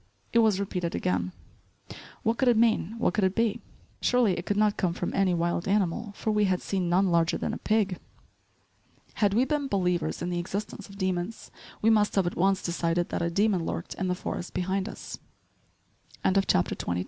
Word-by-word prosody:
It 230 - +5
was 215 -4 +3
repeated 180 -4 -2
again; 90 0 -1 0.9
what 225 +1 0
could 265 - +2
it 240 -2 +5
mean, 225 -3 +2
what 230 - +1
could 210 - +1
it 190 0 +2
be? 225 -2 +1 0.4
Surely 245 -6 +3
it 175 - -6
could 205 - 0
not 210 -1 +3
come 175 -3 0
from 175 - -3
any 190 -2 +2
wild 170 +1 -1
animal 205 +2 0
for 220 - -2
we 210 -1 +3
had 185 -2 +1
seen 185 -3 -2
none 185 +1 +3
larger 170 0 +2
than - - -3
a - - -5
pig. 210 -4 +1 1.2
Had 205 -1 +3
we 245 +3 +4
been 290 0 -1
believers 180 - 0
in 175 - -2
the 175 - -1
existence 200 +4 -5
of 195 - -12
demons, 185 +2 -3 0.3
we 225 - +5
must 210 -2 +3
have 195 -2 +3
at 175 - -2
once 195 +1 +2
decided 170 0 0
that - - -2
a 170 - +1
demon 195 0 +2
lurked 85 - -4
in 190 - -3
the 180 - 0
forest 180 - -5
behind 190 +3 -1
us. - - -8 1.0
*CHAPTER 190 - +2
XXIII. 90 0 -2
190 Hz, 195 wpm, -27 LUFS, 175-210 Hz, 1.2 s, It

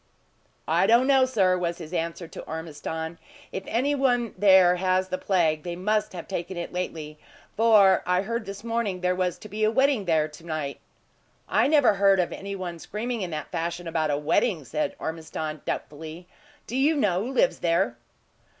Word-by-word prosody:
"I - - +3
don't 235 +3 +5
know, 265 -1 +5
sir," 195 -8 +2
was 170 -1 -2
his 165 0 -9
answer 170 0 -3
to - - -9
Ormiston. 160 +1 -5 0.3
"If 190 - -4
any 265 +5 +1
one 245 -5 +1
there 190 -3 +6
has 185 0 +1
the 185 - -2
plague, 165 -5 +1
they 175 +1 -5
must 210 +3 0
have 175 -2 -7
taken 185 -1 -4
it 175 - -5
lately; 155 -4 -5 0.4
for 210 -4 +5
I 180 +1 +2
heard 230 +1 -3
this 200 +1 -7
morning 230 -5 -2
there 180 0 +2
was 180 -1 -1
to - - -11
be 215 +1 -3
a 215 - +5
wedding 265 -2 +2
there 160 -3 +2
to 150 +2 -14
night." 155 -4 -4 0.7
"I - - +3
never 290 -6 +5
heard 195 -1 +4
of 180 - 0
any 200 0 -6
one 175 -3 -6
screaming 230 +6 -4
in 185 - -3
that 155 -3 -6
fashion 170 +1 -3
about 160 -2 0
a 145 - +1
wedding," 155 - +1
said 150 +6 -2
Ormiston, 160 -1 -5
doubtfully. 160 +4 -6 0.4
"Do 245 - -6
you 285 +4 +3
know 195 -10 +1
who 250 - -4
lives 265 - +2
there?" 165 -8 +1
180 Hz, 185 wpm, -26 LUFS, 165-215 Hz, 0.7 s, there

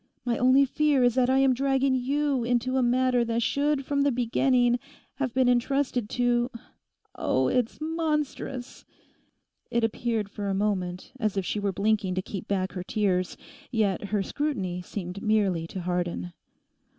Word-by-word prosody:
My 240 -1 +1
only 255 +3 +5
fear 290 -1 +2
is 245 -1 +4
that 255 0 +2
I 260 - +4
am 270 -1 +4
dragging 270 +1 +1
you 275 +1 0
into 245 +2 0
a 260 - +3
matter 250 0 +2
that 230 0 0
should 285 +2 0
from 280 0 0
the 285 0 +3
beginning 245 0 +2 0.4
have 270 -3 -1
been 255 +1 +2
entrusted 250 -2 +1
to—Oh, 240 - -2
it's 245 -3 0
monstrous!' 305 -5 -3 0.9
It 235 -1 0
appeared 225 -1 -1
for 200 0 -5
a 195 - 0
moment 190 -3 -2
as 215 -4 -1
if 195 - 0
she 210 - -2
were 200 -1 0
blinking 200 -1 0
to 185 - -1
keep 195 -2 -6
back 190 -2 -1
her 180 - -5
tears, 185 -3 0 0.3
yet 210 -5 0
her 200 -1 0
scrutiny 195 -11 -2
seemed 180 +1 -6
merely 200 -6 +1
to 185 - -6
harden. 175 - -2
240 Hz, 160 wpm, -27 LUFS, 200-260 Hz, 0.9 s, only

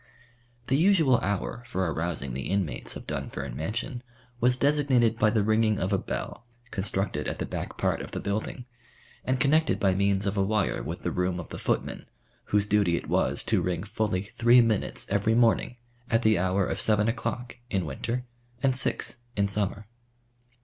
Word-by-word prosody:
The 135 - +2
usual 160 -7 +5
hour 100 +4 -2
for 95 -4 -1
arousing 80 -5 -2
the 65 -1 -4
inmates 95 -5 -2
of - - -8
Dunfern 70 -3 -4
Mansion 115 - -3 0.4
was 125 +1 +3
designated 130 -6 +3
by 110 - +5
the 105 -1 +2
ringing 110 0 +3
of 95 +2 -1
a 95 - +2
bell, 120 - -5 0.2
constructed 95 -1 -2
at - - -3
the - - -2
back - - -5
part - - 0
of - - -7
the - - -4
building, 110 +4 -3 0.6
and 130 0 0
connected 155 +4 +3
by 95 -4 +3
means 100 +1 +1
of 100 +1 -1
a 100 - +3
wire 105 -1 0
with - - -6
the - - -1
room 90 0 -1
of 85 - -8
the - - -7
footman, - - -2 0.4
whose 105 0 +2
duty 100 -5 +2
it - - -6
was - - +1
to - - +1
ring 90 -1 -1
fully 105 -2 -1
three 120 +3 +4
minutes 115 -3 +1
every 100 +3 +2
morning 120 +1 +3 0.3
at 115 +1 +2
the 110 -4 +4
hour 95 +1 +1
of - - -1
seven 105 -1 +3
o'clock 120 +1 -3
in 95 -5 0
winter 120 - -3 0.4
and 135 -1 +3
six 130 - 0 0.2
in 100 0 +3
summer. 100 0 -2
105 Hz, 180 wpm, -27 LUFS, 95-120 Hz, 0.6 s, usual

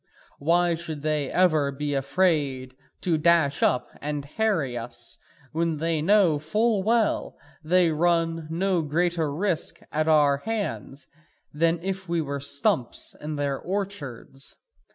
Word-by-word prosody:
Why 170 +3 +3
should 160 -3 -5
they 150 -3 0
ever 155 -6 +3
be 145 +1 -3
afraid 140 -3 0 0.3
to 165 -4 +1
dash 160 -3 +3
up 125 - +2
and 145 -1 -3
harry 160 - 0
us, 120 0 -7 0.3
when 165 0 0
they 160 0 0
know 180 -3 +4
full 210 +7 +1
well 225 +1 +1 0.2
that 155 - -14
they 180 -2 +4
run 165 0 +1
no 180 +2 +1
greater 165 0 0
risk 175 +2 -1
at 155 +1 0
our 145 -3 +5
hands 200 -7 -4 0.5
than 165 +3 +2
if 190 -1 -4
we 170 0 +1
were 140 -2 -3
stumps 140 -3 -1
in 150 0 -4
their 140 -2 -1
orchards? 170 - -4
160 Hz, 135 wpm, -26 LUFS, 145-175 Hz, 0.5 s, our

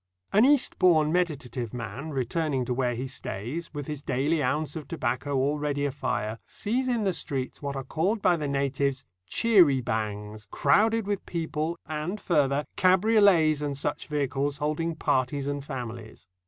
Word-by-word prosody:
An 210 +4 +6
Eastbourne 180 - +4
meditative 135 -9 -2
man 120 +6 -5
returning 135 0 -1
to 125 - -1
where 125 -1 0
he 125 +3 -3
stays, 130 - -5
with 145 -2 -5
his 150 -1 -5
daily 145 +5 0
ounce 150 +5 -1
of 155 -3 -6
tobacco 140 -1 -2
already 145 +1 0
afire, 125 -6 -2
sees 250 +5 -1
in 240 -3 +1
the 190 -2 +1
streets 135 -6 -4
what 140 -1 -3
are 135 - -3
called 175 - 0
by 185 -3 +3
the 150 -3 -3
natives 140 -1 -1 0.2
"cherry 180 - +5
bangs," 105 -2 -4
crowded 220 - +3
with 200 -1 -2
people, 160 0 -2
and, 155 +6 -3
further, 145 -5 +1
cabriolets 185 -5 +4
and 145 -2 -2
such 145 +1 -3
vehicles 145 -1 -1
holding 155 +2 -1
parties 135 -1 0
and 145 0 -3
families. 120 - -7
145 Hz, 155 wpm, -27 LUFS, 130-165 Hz, 0.2 s, An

